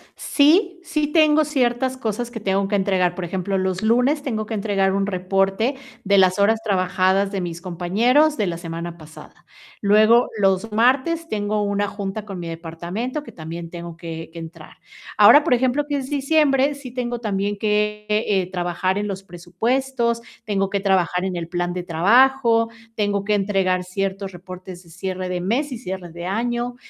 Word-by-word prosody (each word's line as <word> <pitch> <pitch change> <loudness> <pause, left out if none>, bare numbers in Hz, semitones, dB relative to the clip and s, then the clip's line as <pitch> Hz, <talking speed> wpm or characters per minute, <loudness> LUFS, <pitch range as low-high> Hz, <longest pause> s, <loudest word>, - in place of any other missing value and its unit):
Sí, 350 +5 +3
sí 305 -4 -1
tengo 310 0 +4
ciertas 260 -3 0
cosas 235 -1 -3
que 240 -2 -7
tengo 195 -1 0
que 205 - 0
entregar. 190 -3 +1
Por 180 - -4
ejemplo, 190 +2 -2
los 185 0 -1
lunes 250 +7 +2
tengo 220 -6 -3
que 225 - -6
entregar 195 -2 +1
un 195 0 0
reporte 195 +6 0 0.3
de 200 0 +3
las 185 -1 +4
horas 215 +2 +3
trabajadas 190 0 +1
de 195 -2 -2
mis 170 -1 -5
compañeros 225 - +2
de 210 - +1
la 170 -2 -3
semana 170 0 -6
pasada. 155 0 -14 0.4
Luego, 215 +4 +5
los 195 +2 +1
martes 265 +9 +2
tengo 210 0 -1
una 205 0 0
junta 200 +1 -5
con 195 -3 -7
mi 170 - -6
departamento 170 - -5
que - - -11
también 165 +1 -7
tengo 170 -1 -8
que 170 - -25
que 165 -1 -6
entrar. 165 0 -11 0.4
Ahora, 290 - +8
por 295 - +3
ejemplo, 260 +4 +1
que 290 - -1
es 265 -1 -5
diciembre, 285 -1 +2
sí 275 -3 -9
tengo 240 -1 -3
también 205 -1 -1
que, 210 0 0
eh, 205 -3 +1
trabajar 180 +1 -1
en 205 0 -2
los 195 -1 -5
presupuestos, 235 +7 -1 0.2
tengo 195 -2 0
que 200 - -1
trabajar 185 -2 +1
en 185 -1 -2
el 170 -1 -4
plan 175 0 -2
de 180 0 -4
trabajo, 230 +7 +4 0.3
tengo 205 -2 0
que 210 +1 0
entregar 195 -2 +1
ciertos 195 +1 -3
reportes 185 0 -10
de 170 - -19
cierre 185 +2 -4
de 180 -1 -2
mes 250 +10 -1
y 250 - -4
cierre 190 -6 -6
de 170 +1 -7
año. 240 +5 -2
200 Hz, 180 wpm, -22 LUFS, 185-240 Hz, 0.4 s, Ahora